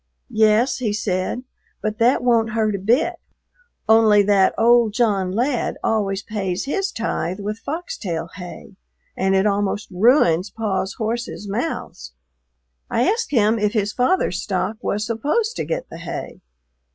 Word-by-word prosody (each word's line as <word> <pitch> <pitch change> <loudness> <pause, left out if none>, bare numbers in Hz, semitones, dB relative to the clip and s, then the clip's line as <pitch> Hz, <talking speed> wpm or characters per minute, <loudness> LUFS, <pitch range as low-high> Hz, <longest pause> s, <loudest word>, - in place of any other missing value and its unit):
"Yes," 220 +3 +3
he 225 -5 -1
said, 205 +2 -2 0.4
"but 215 +1 -3
that 245 +2 +3
won't 230 -3 +2
hurt 220 -2 +1
a 200 - -2
bit, 230 +9 +1 0.7
only 220 -2 +6
that 195 -1 +3
old 235 -1 +4
John 205 -6 +1
Ladd 245 +5 -1
always 200 -3 0
pays 195 -2 -3
his 390 +7 -1
tithe 190 -5 -3
with 210 +2 -4
foxtail 205 - -4
hay 190 +2 -10 0.4
and 190 +1 +1
it 190 +1 +3
almost 205 0 -1
ruins 185 - +3
Paw's 195 -3 -2
horses' 225 -1 -4
mouths." 195 - -4 0.8
I 240 - +1
asked 455 +4 0
him 225 -3 +2
if 210 0 +1
his 210 -2 0
father's 340 +10 +1
stock 220 - -2
was 210 +1 -1
supposed 295 - -1
to - - -2
get - - -3
the - - -8
hay. 165 - -6
215 Hz, 145 wpm, -21 LUFS, 195-240 Hz, 0.8 s, only